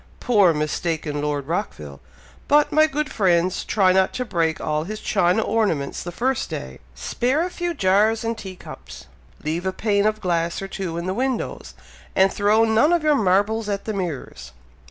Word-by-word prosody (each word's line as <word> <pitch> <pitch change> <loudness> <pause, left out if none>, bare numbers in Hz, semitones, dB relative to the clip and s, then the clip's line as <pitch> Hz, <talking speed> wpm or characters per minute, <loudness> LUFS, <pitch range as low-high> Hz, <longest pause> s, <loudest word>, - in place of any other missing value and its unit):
Poor, 205 -7 +4
mistaken 155 -1 -2
Lord 145 -2 -2
Rockville! 75 - -4 0.5
But, 295 +1 +4
my 310 +1 +5
good 300 -1 -3
friends, 185 -3 +1
try 190 -3 +3
not 190 0 +2
to 250 - -3
break 165 -6 0
all 155 0 -1
his 215 +3 -6
china 195 +1 +1
ornaments 200 -11 -1
the 175 - -6
first 255 +8 -1
day - - -6 0.2
spare 265 +7 0
a 365 - -5
few 350 -1 -3
jars 210 +4 +2
and 230 0 -1
tea 190 -4 -8
cups - - -11 0.4
leave 160 +3 -2
a - - +1
pane 200 +1 +1
of 215 0 -1
glass 170 -3 -1
or 195 - -5
two 185 -4 -5
in 170 - -4
the 185 - -1
windows, 255 +2 -3 0.4
and 190 0 +4
throw 210 +2 +3
none 225 +8 +3
of 340 -3 +1
your 305 -1 +4
marbles 210 -1 +1
at 200 -1 -3
the 220 - -3
mirrors." 175 - -5
195 Hz, 180 wpm, -22 LUFS, 170-225 Hz, 0.5 s, my